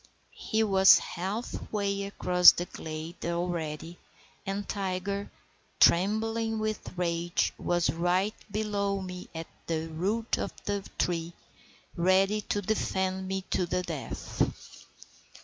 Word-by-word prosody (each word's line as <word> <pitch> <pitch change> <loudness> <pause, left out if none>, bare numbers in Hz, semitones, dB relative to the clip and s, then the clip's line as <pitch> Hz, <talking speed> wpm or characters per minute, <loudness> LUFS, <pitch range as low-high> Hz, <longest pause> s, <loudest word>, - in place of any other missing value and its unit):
He 220 0 +2
was 195 -2 +7
half 195 +7 -4
way 200 -1 -1
across 180 -2 +7
the 175 - -3
glade 160 +1 -7
already, 170 -1 -3 0.5
and 200 +1 -3
Tiger, 200 0 -2 0.5
trembling 220 +5 +3
with 215 -3 -3
rage, 170 -1 0
was 175 -1 +1
right 180 +5 +1 0.2
below 200 -2 -1
me 180 -1 -7
at 165 0 -4 0.2
the 165 0 -2
root 200 +8 -1
of - - -2
the 200 -1 -1
tree, 170 -1 -1 0.6
ready 190 +4 +3
to 205 0 -2
defend 190 -2 -1
me 190 0 -2
to 180 - +1
the 180 +1 -1
death. 155 -9 -4
190 Hz, 115 wpm, -29 LUFS, 175-205 Hz, 0.6 s, was